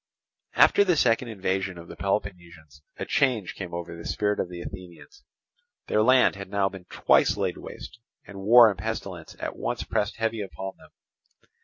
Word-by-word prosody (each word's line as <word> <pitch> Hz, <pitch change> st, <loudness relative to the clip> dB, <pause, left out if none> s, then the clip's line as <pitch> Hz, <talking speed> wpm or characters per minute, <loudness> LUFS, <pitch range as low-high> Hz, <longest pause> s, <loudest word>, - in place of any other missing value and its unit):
After 205 Hz, -, +6 dB
the 180 Hz, -3 st, +2 dB
second 120 Hz, -1 st, +2 dB
invasion 95 Hz, -3 st, -2 dB
of 85 Hz, 0 st, -11 dB
the -, -, -10 dB
Peloponnesians 85 Hz, -7 st, -4 dB, 0.2 s
a -, -, -4 dB
change 125 Hz, -9 st, +1 dB
came 90 Hz, -3 st, -7 dB
over 85 Hz, 0 st, -6 dB
the 85 Hz, -, -10 dB
spirit 105 Hz, +3 st, -1 dB
of 90 Hz, -, -2 dB
the 90 Hz, -1 st, -8 dB
Athenians. 90 Hz, -, -11 dB, 0.6 s
Their 105 Hz, -, +1 dB
land 130 Hz, +1 st, +5 dB
had 100 Hz, -1 st, -8 dB
now 100 Hz, -1 st, +1 dB
been 95 Hz, -2 st, -11 dB
twice -, -, +2 dB
laid -, -, -1 dB
waste; 120 Hz, -, -10 dB, 0.3 s
and 100 Hz, -1 st, -10 dB
war 115 Hz, +4 st, +8 dB
and 100 Hz, -3 st, -2 dB
pestilence 95 Hz, -7 st, -5 dB
at -, -, -4 dB
once -, -, -3 dB
pressed 105 Hz, 0 st, -1 dB
heavy 115 Hz, -1 st, -2 dB
upon 95 Hz, -1 st, -6 dB
them. -, -, -18 dB
100 Hz, 175 wpm, -26 LUFS, 90-110 Hz, 0.6 s, war